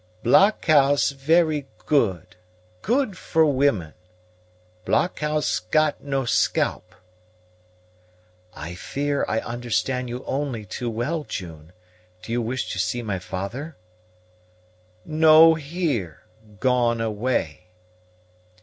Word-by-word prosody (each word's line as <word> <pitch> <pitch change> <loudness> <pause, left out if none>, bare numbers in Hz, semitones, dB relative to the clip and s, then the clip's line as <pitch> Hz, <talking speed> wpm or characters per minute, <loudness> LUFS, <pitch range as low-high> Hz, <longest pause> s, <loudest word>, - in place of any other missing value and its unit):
"Blockhouse 145 - +4
very 150 +1 +1 0.2
good; 105 - 0 0.5
good 245 -2 0
for 160 -2 +1
women. 130 - +1 0.9
Blockhouse 150 - 0
got 150 +12 0
no 135 -2 -2
scalp." 90 -5 0 1.6
"I 80 +4 -7
fear 140 +10 -2
I 110 - -1
understand 120 +2 -2
you 125 +2 -6
only 135 -6 -3
too 120 +5 -4
well, 140 +8 -2
June. 80 - -8 0.5
Do - - -8
you 120 +1 0
wish 125 +3 -3
to 95 - -4
see 120 +6 -1
my 100 -4 -3
father?" 100 - -6 1.3
"No 160 +1 +6
here; 140 - -3 0.4
gone 120 -3 +2
away." 105 -6 -2
130 Hz, 95 wpm, -23 LUFS, 110-150 Hz, 1.6 s, No